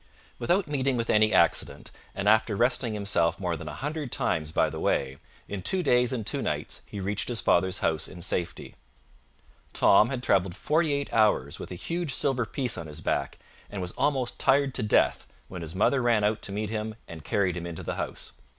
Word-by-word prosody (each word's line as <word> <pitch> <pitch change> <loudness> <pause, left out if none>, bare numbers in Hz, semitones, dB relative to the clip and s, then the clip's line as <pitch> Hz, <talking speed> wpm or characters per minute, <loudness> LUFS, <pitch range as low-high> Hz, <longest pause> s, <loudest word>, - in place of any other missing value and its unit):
Without 175 +9 +1
meeting 135 -3 0
with 115 0 0
any 110 0 +4
accident, 85 -4 +2 0.2
and 100 +1 -2
after 110 0 +4
resting 120 0 +1
himself 85 -5 +1
more 90 -3 -1
than 80 - -8
a 75 - -6
hundred 150 -2 -4
times 75 -1 -1
by - - +2
the - - -6
way, 65 0 0 0.3
in 100 -2 -5
two 185 - +1
days 125 -4 +3
and 120 -5 -3
two - - -2
nights - - -3
he 100 - -7
reached 100 +2 -2
his 120 -2 -1
father's 95 +2 +2
house 80 -2 0
in 90 - -10
safety. 85 0 -3 1.0
Tom 105 +3 +5
had 130 -2 -4
traveled 95 -5 +2
forty 155 +6 +1
eight 140 0 -2
hours 105 - +2
with - - -7
a - - -5
huge 165 - -3
silver 130 -5 +1
piece 125 -5 0
on 80 - -7
his 75 +1 -8
back, - - -2 0.3
and 100 - -6
was 90 -1 -3
almost 135 -4 0
tired 135 0 +3
to - - -3
death, 105 - +2 0.2
when 90 -2 -7
his 80 +1 -7
mother 130 +7 +2
ran 115 -3 +2
out 105 +1 +1
to - - -4
meet 105 +1 -3
him 110 0 -3
and 80 -3 -9
carried 95 0 0
him 85 -1 -5
into 85 -2 -7
the - - -3
house. - - -4
105 Hz, 205 wpm, -27 LUFS, 90-130 Hz, 1.0 s, Tom